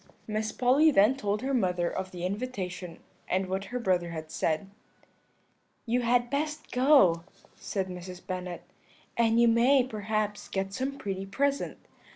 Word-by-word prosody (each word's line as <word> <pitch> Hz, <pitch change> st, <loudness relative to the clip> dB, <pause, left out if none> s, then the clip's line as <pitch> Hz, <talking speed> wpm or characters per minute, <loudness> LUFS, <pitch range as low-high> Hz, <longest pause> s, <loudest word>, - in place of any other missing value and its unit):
"Miss 215 Hz, 0 st, -2 dB
Polly 265 Hz, +6 st, +4 dB
then 225 Hz, -1 st, +5 dB
told 210 Hz, -4 st, -2 dB
her 275 Hz, +1 st, -1 dB
mother 180 Hz, -7 st, +1 dB
of 190 Hz, +2 st, -3 dB
the 180 Hz, -1 st, -5 dB
invitation 185 Hz, -5 st, -4 dB, 0.3 s
and 190 Hz, +1 st, +1 dB
what 190 Hz, +1 st, -3 dB
her 250 Hz, -, -4 dB
brother 185 Hz, -7 st, +1 dB
had 160 Hz, -1 st, -7 dB
said. 160 Hz, +5 st, -1 dB, 1.2 s
"'You 245 Hz, +1 st, +1 dB
had 240 Hz, +1 st, +2 dB
best 300 Hz, +2 st, -2 dB
go,' 250 Hz, -, +5 dB, 0.3 s
said 195 Hz, -2 st, -3 dB
Mrs. 180 Hz, 0 st, -8 dB
Bennet, 180 Hz, -1 st, -5 dB, 0.5 s
'and 230 Hz, 0 st, +3 dB
you 235 Hz, -, +6 dB
may, 245 Hz, +4 st, +5 dB
perhaps, 215 Hz, -3 st, -2 dB
get 195 Hz, 0 st, -3 dB
some 270 Hz, +4 st, -3 dB
pretty 195 Hz, -3 st, -4 dB
present. 280 Hz, +7 st, -1 dB
210 Hz, 150 wpm, -29 LUFS, 185-250 Hz, 1.2 s, you